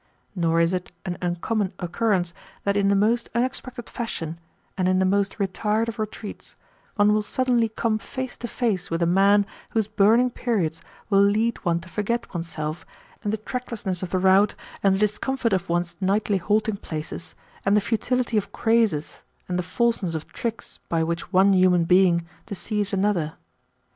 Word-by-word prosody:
Nor 165 -3 +1
is 170 +2 +2
it 180 -1 -3
an 180 - -2
uncommon 185 +3 -1
occurrence 180 -1 0 0.3
that 200 0 +1
in 200 -1 +3
the 200 - +4
most 225 +4 +2
unexpected 250 -1 -2
fashion, 165 -9 -4 0.4
and 185 -1 +1
in 185 - +3
the 190 - +3
most 200 +1 +1
retired 210 +3 0
of 225 - -7
retreats, 215 -1 -6 0.4
one 205 0 +4
will 215 - +2
suddenly 240 0 +1
come 220 0 0
face 260 +2 -5
to 240 - -5
face 210 -6 -1
with 165 +1 0
a - - +3
man 200 +3 +4 0.2
whose 220 -3 0
burning 220 +4 +4
periods 185 -11 -1 0.3
will 195 0 +6
lead 215 +3 +2
one 170 -3 +1
to 180 - -12
forget 210 +7 -2
oneself 165 -2 -4 0.4
and 205 - 0
the 220 - 0
tracklessness 220 -5 -4
of 185 - -4
the 185 - 0
route 190 +2 +4 0.3
and 195 -1 +4
the - - -2
discomfort 230 +3 0
of 185 -1 -1
one's 175 0 0
nightly 200 +1 +2
halting 210 +2 +1
places, 155 -1 -6 0.3
and 200 +2 +4
the - - +6
futility 240 +2 0
of 205 - -1
crazes 225 -10 +1 0.3
and 180 0 -1
the - - +2
falseness 205 -2 0
of 160 - -4
tricks 230 -1 -5
by 165 -1 +1
which 170 +2 -3
one 195 +1 +5
human 185 -2 +4
being 175 -1 +4 0.2
deceives 205 0 -2
another. 190 -6 +1
200 Hz, 175 wpm, -24 LUFS, 180-220 Hz, 0.4 s, will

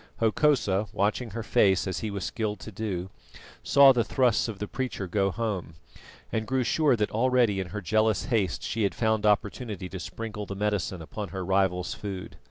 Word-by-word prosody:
Hokosa, 110 -4 +2
watching 105 +4 0
her 115 +2 -5
face 95 -3 +3
as 95 - -2
he 110 - -3
was 100 -2 -4
skilled 105 -2 -3
to 110 - -8
do, 95 -3 -4 0.5
saw 140 -1 +7
the 120 -2 +2
thrusts 125 -3 +2
of 110 -3 -5
the 105 - -4
preacher 125 -5 -3
go 95 +1 +1
home, 100 -6 -3 0.6
and 110 0 -2
grew 130 -1 +1
sure 150 +1 +3
that 105 -2 -1
already 120 -3 +2
in 95 - -3
her 105 +3 -5
jealous 110 +3 +1
haste 110 - 0
she 115 - -2
had 100 - +1
found 110 -2 +1
opportunity 105 -1 0
to 95 - -6
sprinkle 105 +1 -6
the 100 - -5
medicine 100 -4 -1
upon 105 +6 -6
her 95 +2 -5
rival's 95 -1 +1
food. 95 -3 -7
105 Hz, 185 wpm, -27 LUFS, 95-115 Hz, 0.6 s, saw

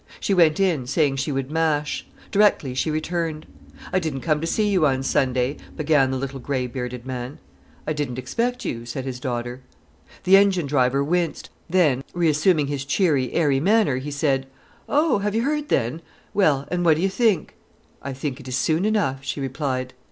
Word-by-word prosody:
She 200 - 0
went 165 -3 +4
in, 165 -10 +1
saying 140 -1 +1
she 145 - -1
would 135 0 -3
mash. 155 -2 0 0.2
Directly, 200 - +3
she 130 +5 -1
returned. 155 0 -2 0.5
"I 185 - +3
didn't 155 -6 -3
come 155 -2 0
to 165 - -2
see 210 +5 +1
you 185 -7 +3
on 130 -1 0
Sunday," 130 0 +1 0.2
began 150 -4 +3
the 130 - -1
little 135 +1 -5
grey 130 0 -2
bearded 125 0 -5
man. 125 +1 -5 0.5
"I 155 - -1
didn't 145 -5 -3
expect 235 - -2
you," 115 0 -4
said 130 +2 -5
his 130 -2 -5
daughter. 120 0 -4 0.6
The 190 +1 +7
engine 195 -4 +3
driver 135 -1 +2
winced; 170 +2 -1 0.2
then, 155 -8 +3
reassuming 160 -1 +3
his 140 -1 -3
cheery, 140 -3 +1
airy 145 -5 +2
manner, 200 - +3
he 135 +3 -5
said: 140 -2 0 0.4
"Oh, 295 -5 +3
have 205 +1 -1
you 230 - +1
heard 300 +1 -1
then? 130 +6 0 0.3
Well, 150 -9 +2
and 175 0 0
what 165 -3 +5
do 165 - -1
you 195 - +3
think——?" 205 -4 +1 0.5
"I 140 - -5
think 135 0 -4
it 135 - -11
is 130 - -2
soon 160 +8 +1
enough," 140 -12 0
she 140 - -4
replied. 130 -2 -3
145 Hz, 185 wpm, -23 LUFS, 130-175 Hz, 0.6 s, The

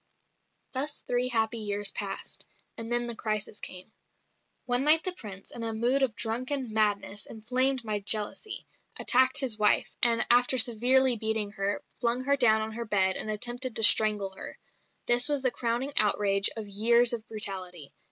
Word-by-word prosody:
Thus 285 +3 -3
three 245 0 -1
happy 225 -1 -1
years 205 -1 0
passed; 195 -1 -4 0.3
and 230 0 -7
then 240 0 +1
the 235 -1 -4
crisis 215 -2 -3
came. 185 +4 -8 0.7
One 245 +1 0
night 310 +2 +4
the 370 - 0
Prince, 200 - -11
in 235 - -7
a 225 -1 -3
mood 245 +5 0
of 255 -5 -1
drunken 250 +2 -2
madness, 205 -2 -1
inflamed 255 +3 0
by 215 -2 -3
jealousy, 210 - 0 0.3
attacked 260 +1 +2
his 240 -5 +1
wife, 210 0 +2
and, 235 -1 +4
after 245 +2 +3
severely 245 +2 +3
beating 220 -1 -2
her, 200 0 -4 0.2
flung 240 +1 -1
her 280 +1 +1
down 220 -5 +3
on 220 0 -5
her 235 +1 -6
bed 190 -3 0
and - - 0
attempted 240 +3 -2
to 225 - +2
strangle 210 -2 +4
her. 190 - -11 0.5
This 245 +4 +3
was 285 -2 -2
the 255 - +1
crowning 240 +4 -3
outrage 200 -1 +4
of 215 -2 -6
years 235 +4 +3
of 225 -2 -6
brutality. 185 -8 -3
225 Hz, 170 wpm, -27 LUFS, 210-250 Hz, 0.7 s, night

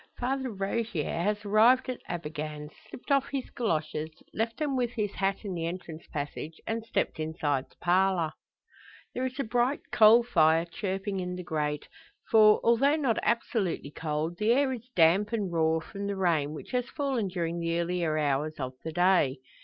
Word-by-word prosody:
Father 265 +1 -1
Rogier 200 -3 -2
has 205 +5 -1
arrived 230 +6 +5
at 255 -1 -4
Abergann; 150 -2 -5 0.2
slipped 245 - -8
off 275 0 +3
his 275 -2 -4
goloshes, 155 -8 -2 0.2
left 225 +1 -2
them 295 -3 -1
with 245 -2 +1
his 210 -4 -1
hat 195 +2 -1
in 195 - -3
the 165 -1 -2
entrance 170 -2 -7
passage; 150 +1 -5
and 225 0 -2
stepped 225 - -2
inside 155 -4 -1
the - - -26
parlour. 180 -2 +2 0.8
There 255 +1 -1
is 260 +2 -9
a - - +1
bright 245 +4 +1
coal 225 +2 +7
fire 165 -7 +3
chirping 195 +3 -3
in 180 0 -3
the 180 - -6
grate; 150 -3 -2 0.4
for, 215 -1 +7
although 265 +6 +4
not 270 -8 +1
absolutely 215 - -1
cold, 155 +2 -3
the 215 +2 +3
air 270 0 +2
is 245 0 -9
damp 185 +6 +4
and 205 -5 -1
raw 160 -1 +2
from 200 +4 -6
the 200 - -2
rain 160 -5 +1
which - - -9
has 250 -1 -1
fallen 270 -8 -1
during 170 -2 -2
the 165 0 -1
earlier 170 -2 0
hours 150 +1 0
of 130 -1 -3
the 160 - -4
day. 175 -5 +3
190 Hz, 175 wpm, -29 LUFS, 160-230 Hz, 0.8 s, coal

